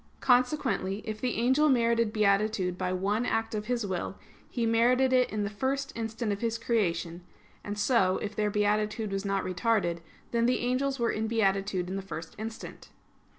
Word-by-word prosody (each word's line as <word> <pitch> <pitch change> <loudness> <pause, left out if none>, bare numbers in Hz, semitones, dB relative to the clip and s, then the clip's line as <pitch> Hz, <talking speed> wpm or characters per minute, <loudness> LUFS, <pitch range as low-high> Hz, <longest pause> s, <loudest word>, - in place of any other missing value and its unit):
Consequently, 245 -6 +1
if 215 -1 -5
the 250 -2 -1
angel 260 +6 +3
merited 230 -3 +2
beatitude 200 -3 +1
by 180 0 -2
one 200 +5 0
act 225 -2 -1
of 210 0 -3
his 240 -3 -1
will, 190 0 -3 0.3
he 235 -2 -1
merited 250 +3 +3
it 255 -1 +4
in 215 -1 -2
the 200 - -2
first 270 +6 -2
instant 225 -1 -3
of 200 - -3
his 230 -1 0
creation; 175 -7 -1 0.4
and 205 0 -5
so, 205 -4 +3
if 210 0 -5
their 210 -1 +1
beatitude 210 +1 0
was 195 +1 -2
not 195 -1 0
retarded, 185 -2 0 0.3
then 235 0 +2
the 250 - +1
angels 265 +3 0
were 235 -2 +1
in 220 +1 -2
beatitude 195 -4 0
in 190 +2 -3
the - - -3
first 165 -4 -7
instant. 225 +1 -7
215 Hz, 180 wpm, -29 LUFS, 195-235 Hz, 0.4 s, it